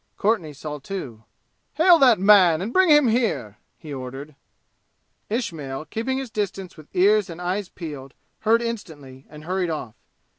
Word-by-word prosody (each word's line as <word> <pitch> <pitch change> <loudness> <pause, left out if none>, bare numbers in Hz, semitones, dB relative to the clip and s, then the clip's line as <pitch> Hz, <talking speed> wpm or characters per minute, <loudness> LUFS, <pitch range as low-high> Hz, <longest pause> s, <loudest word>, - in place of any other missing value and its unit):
Courtenay 200 -8 0
saw, 150 +1 -7
too. 130 - -7 0.5
"Hail 340 +1 +6
that 250 -6 +6
man 190 -5 +6
and 205 +7 -4
bring 375 -2 +4
him 295 -3 +6
here!" 180 - -1 0.2
he 150 -2 -9
ordered. 135 +3 -7 1.0
Ismail, 155 - -4
keeping 260 +4 -2
his 265 -4 -5
distance 195 -3 -4
with 155 -2 -14
ears 200 +2 +3
and 165 0 -8
eyes 185 +2 -3
peeled, 145 -6 -9 0.2
heard 230 +2 +2
instantly 145 - -7
and 150 0 -12
hurried 180 +1 -2
off. 150 -8 -5
180 Hz, 150 wpm, -23 LUFS, 150-220 Hz, 1.0 s, Hail